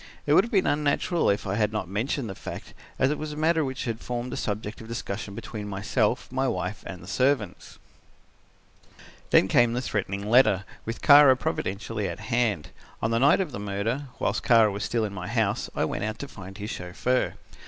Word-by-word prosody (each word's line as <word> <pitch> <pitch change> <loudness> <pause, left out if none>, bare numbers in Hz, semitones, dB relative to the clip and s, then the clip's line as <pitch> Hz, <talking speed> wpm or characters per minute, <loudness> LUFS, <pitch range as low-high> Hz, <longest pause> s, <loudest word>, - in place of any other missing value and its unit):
It - - +3
would - - +7
have 235 - -5
been 195 -3 +3
unnatural 150 +4 +1
if 100 0 0
I 95 - -2
had 105 -1 +2
not 110 -5 -3
mentioned 115 - -2
the 95 - -5
fact, - - -8 0.2
as 130 +2 +3
it 150 - -2
was 155 -1 -4
a - - -8
matter 160 +1 +2
which 130 -2 -4
had 115 -2 -3
formed 120 0 -4
a - - -2
subject 105 +1 -4
of 110 - -10
discussion 105 -3 -5
between 105 -1 -6
myself, 105 +4 -1
my 130 +1 0
wife 90 -1 -3
and 90 -2 -8
the - - -12
servants. 125 -3 0 1.5
"Then - - +5
came 120 +4 +4
the 120 - 0
threatening 100 -3 -3
letter, 110 -5 +4 0.2
with 115 +1 -5
Kara 145 -3 +8
providentially 105 -2 -3
at - - -6
hand. 115 -9 +1 0.3
On 110 - -1
the 115 - +2
night 140 +8 +5
of 175 -6 -3
the 120 - -6
murder, 105 +7 -2
whilst 100 - 0
Kara 115 -3 +5
was 100 0 -4
still 115 0 0
in 100 - -5
my 90 -2 -6
house, 110 -1 0
I - - +1
went - - -3
out 110 0 -3
to 140 - -6
find 95 -6 -10
his 105 +1 -5
chauffeur. 95 +8 -1
110 Hz, 205 wpm, -26 LUFS, 100-130 Hz, 1.5 s, Kara